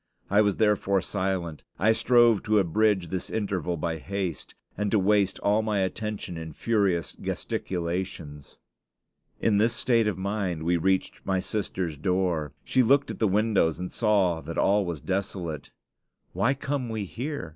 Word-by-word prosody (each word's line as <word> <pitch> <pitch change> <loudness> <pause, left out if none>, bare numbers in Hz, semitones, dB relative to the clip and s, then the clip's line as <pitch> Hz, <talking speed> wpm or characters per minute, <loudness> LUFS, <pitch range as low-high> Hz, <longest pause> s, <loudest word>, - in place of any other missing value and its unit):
I 100 +1 +5
was 100 -3 +1
therefore 105 -2 +2
silent. 95 -6 -2
I 105 +4 +4
strove 120 -2 +4
to 110 0 +3
abridge 100 -1 +2
this 95 0 -4
interval 95 -5 -2
by 80 +1 -2
haste, 95 -2 -4 0.2
and 105 +1 -1
to 110 - +3
waste 100 0 +2
all 105 +2 +3
my 105 -2 0
attention 100 -2 -3
in 80 -1 -7
furious 100 -4 0
gesticulations. 85 -5 -4 0.8
In 105 -3 +2
this 115 +2 +3
state 120 -2 +2
of 100 -4 -1
mind 95 -4 -2
we 85 +2 +2
reached 95 +3 0
my 95 -1 0
sister's 90 -6 -3
door. 90 -4 0
She 130 - +2
looked 135 +4 +3
at - - -8
the 110 - +3
windows 100 -5 +2
and 90 0 -5
saw 100 -7 +2
that 85 - -7
all 100 -1 +3
was 85 -5 -4
desolate. 90 -6 -3 0.6
"Why 130 +4 +2
come 135 -2 -3
we 110 -2 -3
here? 135 - -5
95 Hz, 155 wpm, -27 LUFS, 85-110 Hz, 0.8 s, I